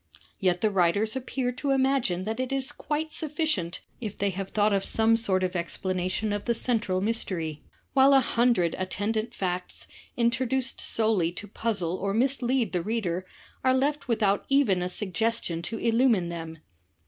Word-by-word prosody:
Yet 180 -2 +1
the 215 - +2
writers 195 +4 +2
appear 260 -1 -2
to 265 +3 -4
imagine 265 -9 +2
that 220 +4 -3
it 255 0 -2
is 270 +1 -1
quite 305 +1 -3
sufficient 305 - -1 0.2
if 215 -4 -5
they 200 0 +1
have 195 +1 -5
thought 210 0 +2
of 195 -1 +1
some 225 0 +3
sort 190 -5 +1
of 185 0 -1
explanation 185 +4 -1
of 205 - -3
the 235 - +1
central 220 -6 0
mystery, 180 -8 -1 0.3
while 275 0 +6
a - - +8
himdred 235 -9 +2
attendant 215 +5 -2
facts, 180 -1 -3 0.3
introduced 250 +2 0
solely 215 -7 +1
to 205 - -8
puzzle 195 -5 -2
or 195 +1 -2
mislead 250 -2 +1
the 180 - +1
reader, 185 -3 -2 0.4
are 260 0 +4
left 285 +2 0
without 210 -4 +2
even 265 -10 +3
a 180 - -1
sug 190 0 -5
gestion 220 -4 -1
to 225 +7 -5
illumine 230 -6 +2
them. 165 -1 -6
215 Hz, 165 wpm, -27 LUFS, 185-250 Hz, 0.4 s, a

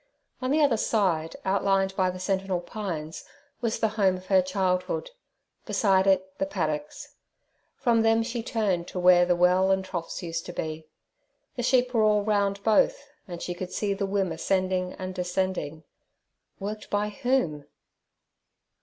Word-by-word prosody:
On 255 - -1
the 300 +2 +3
other 265 -6 +3
side, 180 -8 0
outlined 195 0 +1
by 185 -1 +2
the 180 - -5
sentinel 190 0 -1
pines, 175 -5 -5 0.4
was 230 -2 -1
the 220 - +2
home 190 -2 +3
of 185 - -13
her 190 0 +4
childhood; 185 - -1 0.6
beside 195 -2 +3
it 190 -1 +1
the 195 - 0
paddocks. 155 -6 -4 0.6
From 235 -3 +2
them 225 0 +3
she 235 0 -3
turned 200 -7 -1
to 180 - -5
where 175 0 +6
the 175 - +3
well 180 +2 +4
and 190 0 +1
troughs 180 -1 -5
used 165 -1 -3
to 175 - -6
be. 155 -1 -5 0.7
The 245 - -3
sheep 250 0 +2
were 230 - +3
all 210 -1 +3
round 200 -1 0
both, 225 - +3 0.3
and 175 -2 -7
she 175 - -3
could 180 +1 -6
see 200 +2 -1
the 195 0 -2
wim 195 -3 0
ascending 185 +1 0
and 185 0 -6
descending—worked 185 +3 -6
by 205 +1 0
whom? 210 - -1
190 Hz, 155 wpm, -26 LUFS, 180-210 Hz, 0.7 s, where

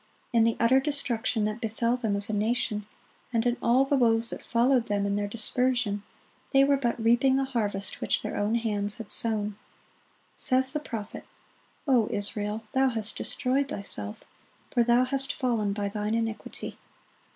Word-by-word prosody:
In 230 -1 +5
the 230 - +1
utter 250 +3 +5
destruction 250 -6 0
that 215 +3 -3
befell 230 +1 0
them 225 -5 -1
as 200 +1 -2
a 215 - -3
nation, 210 -1 0 0.4
and 230 -1 0
in 240 0 +2
all 250 +3 +4
the 280 - +1
woes 230 -2 +3
that - - -6
followed 240 +1 +2
them 205 -1 0
in 200 0 0
their 205 0 -1
dispersion, 230 -1 0 0.5
they 270 0 +6
were 280 0 +4
but 240 -3 -1
reaping 240 +4 +3
the 270 - +2
harvest 205 -7 -3
which - - 0
their - - -4
own 210 +3 0
hands 210 -3 -1
had 225 -3 -8
sown. 210 -3 0 0.8
Says 260 0 +4
the 300 - 0
prophet, 225 -7 -7 0.6
"O 245 -5 +4
Israel, 210 +1 -2
thou 265 0 +3
hast 225 -3 -4
destroyed 270 +2 0
thyself;" 105 - -2 0.5
"for 240 - +2
thou 240 +1 +4
hast 270 +1 -1
fallen 230 -6 0
by 200 0 -2
thine 210 +2 -2
iniquity." 225 -1 -4
230 Hz, 170 wpm, -27 LUFS, 210-255 Hz, 0.8 s, they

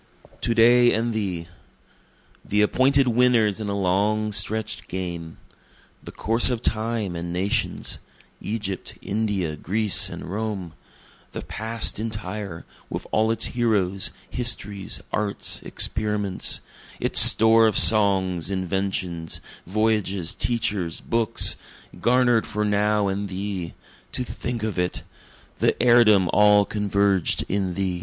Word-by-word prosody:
To 115 - -1
Day 120 +1 +5
and 115 +1 -1
Thee 95 -6 -3 1.0
The 105 +1 +1
appointed 135 +5 +3
winners 115 -4 +2
in 105 -2 -4
a 100 - -2
long 105 +3 0
stretch'd 110 +1 -2
game; 85 -3 -6 0.7
The - - -9
course 115 +4 +4
of 125 -2 -3
Time 110 -4 -1
and 85 +1 -5
nations 95 +3 -1 0.4
Egypt, 105 -3 -4
India, 100 -6 -2
Greece 105 +6 +2
and - - -8
Rome; 100 -3 -5 0.6
The - - -6
past 110 -1 -3
entire, 105 -5 -5 0.2
with - - -5
all 110 +1 +1
its 115 - +2
heroes, 100 -6 0 0.2
histories, 105 -5 -2
arts, 105 -2 -2
experiments, 105 -3 0 0.4
Its - - +3
store 110 0 +6
of 110 - 0
songs, 95 -5 +4
inventions, 95 -3 -3 0.3
voyages, 100 -3 -1
teachers, 105 -8 -1
books, 115 -2 +1 0.4
Garner'd 120 -2 +2
for 105 0 -2
now 105 0 +1
and 100 +1 -3
thee 95 -2 -5 0.4
To 125 - -2
think 120 -1 -5
of 110 -4 -3
it! 90 0 -2 0.6
The - - +1
heirdom 115 -6 +5
all 105 -1 +5
converged 100 -3 0
in 95 -2 -2
thee! 95 -2 -2
105 Hz, 120 wpm, -23 LUFS, 95-110 Hz, 1.0 s, store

